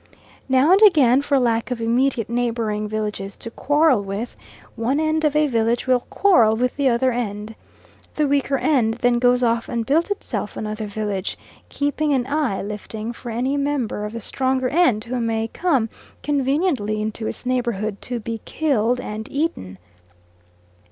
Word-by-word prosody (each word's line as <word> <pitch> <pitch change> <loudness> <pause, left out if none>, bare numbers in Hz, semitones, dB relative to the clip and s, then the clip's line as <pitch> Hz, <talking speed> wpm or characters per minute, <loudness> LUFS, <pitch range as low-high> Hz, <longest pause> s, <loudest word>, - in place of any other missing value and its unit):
Now 265 +5 +4
and 390 +2 +6
again, 280 - +6
for 285 0 +1
lack 230 -2 +1
of 250 -2 -3
immediate 235 0 +1
neighbouring 230 -3 -1
villages 210 -2 -4
to 230 - -8
quarrel 290 -2 +3
with, 200 +4 -5 0.4
one 245 +6 0
end 315 0 0
of 300 -1 +2
a 305 0 +4
village 235 -3 0
will 255 -1 +3
quarrel 240 - +3
with 250 +2 0
the 275 -2 +2
other 255 +2 +2
end. 215 -2 -4 0.6
The 300 -1 +1
weaker 280 -1 +1
end 245 -8 +2
then 245 0 +2
goes 250 0 +3
off 230 0 +1
and 230 -1 -2
builds 315 - +2
itself 405 - -4
another 215 0 -4
village, 205 -2 -3 0.3
keeping 290 +1 0
an 255 -3 +1
eye 285 -8 -1
lifting 215 +2 -5
for 240 - -9
any 250 +5 -1
member 280 -7 -1
of 210 +1 -5
the 230 - -5
stronger 260 +2 -1
end 265 -9 +2
who 245 +2 -3
may 225 -1 -1
come 275 -10 +1 0.4
conveniently 275 - 0
into 220 +1 -3
its - - -6
neighbourhood 235 -5 -1
to 245 -1 -4
be 225 0 -5
killed 250 -6 0
and 215 -2 -6
eaten. 270 - -2
245 Hz, 165 wpm, -21 LUFS, 220-280 Hz, 0.6 s, and